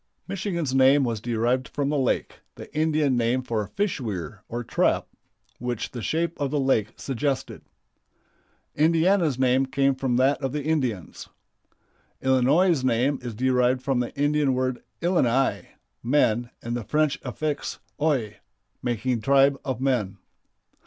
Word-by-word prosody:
Michigan's 180 -7 -2
name 135 +2 +5
was 115 -4 -2
derived 120 +2 0
from 140 -1 -2
the 150 - 0
lake, 130 - -1 0.2
the - - -12
Indian 155 -3 +2
name 120 +2 +1
for 110 -4 -2
fish 200 -7 -2
weir 100 -4 -5
or 120 +1 -4
trap, - - +1 0.5
which 125 -2 -3
the 120 - -6
shape 165 +6 -1
of 140 - 0
the 145 +1 0
lake 115 -5 +1
suggested. 135 +1 -3 1.1
Indiana's 165 -1 +3
name 130 +1 +2
came 135 +1 +2
from 130 -2 -1
that 130 +4 +2
of 135 -1 -2
the 150 -1 -2
Indians. 130 - -2 0.9
Illinois' 135 +5 +3
name 130 +3 +1
is 120 -3 -6
derived 125 +1 +2
from 135 -3 +1
the 120 - -2
Indian 145 -2 +2
word 130 -1 -1 0.2
"Illini" 135 -7 +1 0.3
(men) 120 -2 +2
and 120 +1 -3
the 120 - -3
French 150 +2 +1
affix 145 +3 -3 0.2
"ois," 135 -9 0 0.4
making 120 0 -1
"tribe 140 +2 +4
of 130 -3 -3
men." 120 -8 0
130 Hz, 140 wpm, -25 LUFS, 120-145 Hz, 1.1 s, name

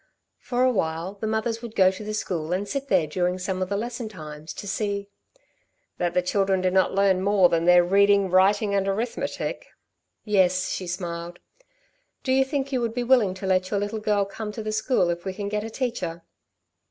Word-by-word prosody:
"For 245 0 -1
a 255 - +4
while 165 -3 -2
the 205 +2 -5
mothers 220 +1 -1
would 235 -2 -8
go 185 -1 +5
to 190 +3 -8
the 215 0 -4
school 170 -6 -3
and 195 +3 -2
sit 275 +2 -3
there 185 - +3
during 180 +4 -1
some 185 0 -3
of 185 - -1
the 200 - -1
lesson 235 +1 -4
times 155 -5 -9
to 200 - -7
see 200 0 -2 0.4
" - - -46
"That 175 -1 -1
the 180 - +3
children 195 +1 +1
did 185 0 0
not 190 0 +3
learn 195 -2 +3
more 195 -2 +4
than 165 0 +1
their 180 0 +7
reading, 200 +1 +3
writing 200 +2 +3
and 195 -1 +1
arithmetic." 220 +5 -3 0.6
"Yes," 185 -3 +2
she 185 - -4
smiled. 175 -1 -5 0.9
"Do 260 - -1
you 265 +1 +4
think 275 0 -3
you 255 -2 0
would 230 -1 -2
be 245 - 0
willing 240 -7 +3
to 190 - -7
let 185 -1 +1
your 205 - 0
little 205 +2 -3
girl 210 -2 +1
come 210 +2 -6
to 220 - -6
the 215 - -3
school 215 -4 +1
if 170 0 -5
we 190 -1 -4
can 200 0 -4
get 210 0 -2
a 225 - -5
teacher?" 215 -9 -3
200 Hz, 215 wpm, -25 LUFS, 185-220 Hz, 0.9 s, their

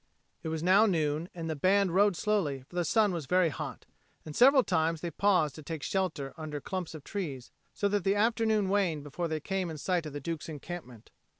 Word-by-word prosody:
It - - -6
was 160 0 -3
now 195 +5 +5
noon, 160 -2 0
and 165 -2 -5
the 160 - -2
band 190 +4 +2
rode 200 0 +4
slowly, 165 -11 0
for - - -15
the 175 - +1
sun 210 +3 +3
was 160 -6 -4
very 180 0 +3
hot, - - -6 0.4
and 155 -2 -8
several 265 +1 +6
times 160 -3 0
they 170 - -3
paused 180 -5 +2
to 155 - -10
take 155 -1 -6
shelter 170 -8 -2
under 155 -2 -5
clumps 180 +1 -5
of 150 - -9
trees, 150 - -5 0.2
so 205 - +1
that 205 -2 0
the 195 +2 +2
afternoon 220 -2 +2
waned 185 -7 +1
before 150 +4 -3
they 155 -1 -2
came 190 +2 -2
in 160 - -6
sight 175 +1 -1
of 150 - -8
the 145 - -4
Duke's 165 +2 -5
encampment. 150 -6 -8
170 Hz, 215 wpm, -30 LUFS, 155-195 Hz, 0.4 s, several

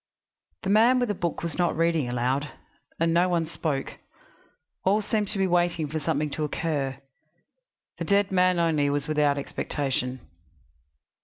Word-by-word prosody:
The 195 - 0
man 230 +5 +5
with 245 -2 0
the - - +1
book 175 -4 -3
was 170 0 -4
not 175 -3 +1
reading 165 -5 +1
aloud, 130 +4 -1 0.5
and 165 0 +2
no 175 +2 +3
one 170 -2 +1
spoke; 155 -4 -3 0.8
all 205 +3 +2
seemed 210 0 0
to 205 - -2
be 195 - +2
waiting 175 -3 +1
for 155 +2 -3
something 150 0 -1
to 155 - -3
occur; 145 -4 -2 1.0
the - - -2
dead 200 -1 +2
man 185 -1 +3
only 160 -4 +2
was 145 0 -1
without 150 -2 +2
expectation. 130 -2 -2
165 Hz, 155 wpm, -26 LUFS, 145-185 Hz, 1.0 s, man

